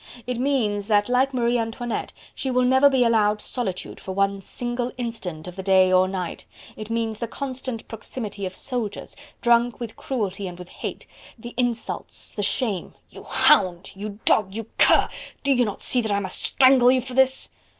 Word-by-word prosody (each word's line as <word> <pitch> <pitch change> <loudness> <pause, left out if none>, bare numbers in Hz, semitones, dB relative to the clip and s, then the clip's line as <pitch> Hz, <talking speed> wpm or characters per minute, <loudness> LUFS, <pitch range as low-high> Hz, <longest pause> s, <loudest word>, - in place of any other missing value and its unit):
it 250 -1 -3
means, 220 -7 0
that 205 -2 +3
like 255 +2 +3
Marie 240 -2 +1
Antoinette, 230 +1 -3 0.2
she 265 - -3
will 250 0 +2
never 260 +3 +5
be 265 -2 +3
allowed 215 -3 +3
solitude 205 -6 -4
for 190 - -6
one 195 0 +1
single 240 +4 -3
instant 200 -10 -5
of 180 - -8
the 190 - -5
day 190 -1 +4
or 185 0 +5
night... 185 -2 -4 0.3
it 215 0 -8
means 225 -1 -2
the 235 - -2
constant 255 -2 -5
proximity 215 -2 -6
of 185 - -9
soldiers, 230 -5 -4 0.3
drunk 235 0 +3
with 235 -3 -6
cruelty 200 -6 -3
and 175 -1 -8
with 180 0 -10
hate... - - -6 0.3
the 240 +1 -9
insults, 240 -2 -3
the 205 - -3
shame..." 205 -2 -1 0.2
"You - - -12
hound!... 185 -1 +3
you 205 +1 -7
dog!... 195 -2 +3
you 225 -1 -4
cur!... - - +6 0.4
do 280 - +2
you 245 -2 +3
not 205 - -5
see 250 - +3
that 220 -2 -2
I 200 - +2
must 190 -2 -2
strangle 260 -2 +5
you 260 0 +2
for 255 +1 -8
this!..." 265 +1 +3
225 Hz, 185 wpm, -24 LUFS, 200-250 Hz, 0.4 s, cur